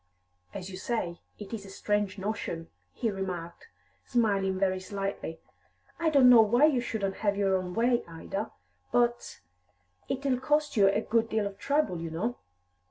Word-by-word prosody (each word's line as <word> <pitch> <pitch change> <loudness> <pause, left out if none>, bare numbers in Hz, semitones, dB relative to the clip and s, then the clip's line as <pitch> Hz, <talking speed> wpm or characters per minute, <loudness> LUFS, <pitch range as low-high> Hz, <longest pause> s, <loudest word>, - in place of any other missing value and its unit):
"As 185 - -7
you 185 - -7
say, 185 -4 -3 0.2
it's 210 0 -6
a 195 - -11
strange 205 +1 -1
notion," 190 -5 -4 0.2
he 230 - -1
remarked, 185 - -5 0.4
smiling 200 -5 +1
very 190 -1 +1
slightly. 195 -4 -4 0.6
"I 335 -1 +2
don't 280 -4 +6
know 245 -2 +9
why 240 +6 +5
you 280 -5 +3
shouldn't 200 -5 -2
have 200 -2 0
your 195 -1 +2
own 185 -1 -3
way, 240 +1 +2
Ida, 195 +6 -5 0.4
but 240 0 +1 0.7
it'll 270 -1 0
cost 295 +2 +1
you 200 -3 +6
a 200 +2 +2
good 230 0 +1
deal 220 -2 0
of 200 0 -6
trouble, 280 - 0
you 165 - -4
know." 210 +10 -3
205 Hz, 160 wpm, -29 LUFS, 190-240 Hz, 0.7 s, know